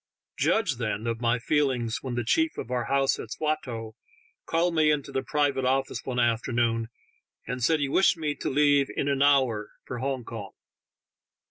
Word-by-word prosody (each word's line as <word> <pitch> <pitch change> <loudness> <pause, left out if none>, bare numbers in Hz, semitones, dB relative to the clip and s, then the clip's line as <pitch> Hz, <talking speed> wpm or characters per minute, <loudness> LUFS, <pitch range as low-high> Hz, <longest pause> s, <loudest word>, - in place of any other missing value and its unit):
Judge, 195 - +2
then, 110 -2 -2
of 115 0 -2
my 115 0 +2
feelings 125 -3 0
when 130 -2 -4
the 120 - -1
chief 320 - +1
of 120 - -6
our 125 -2 -1
house 135 -1 +1
at - - -7
Swatow 125 -8 -3 0.5
called 170 +1 +1
me 155 -2 +3
into 150 -2 0
the 135 - -1
private 145 -2 0
office 135 +1 0
one 125 -2 -4
afternoon, 115 -1 +1 0.6
and 125 -1 -4
said 160 +5 +3
he 140 - 0
wished 180 +5 +3
me 150 -2 -1
to - - -4
leave 145 0 +3
in 140 - 0
an 140 -1 0
hour 130 -7 +3 0.2
for 125 - -5
Hong 135 -1 -2
Kong. 110 -3 -8
130 Hz, 175 wpm, -27 LUFS, 120-145 Hz, 0.6 s, me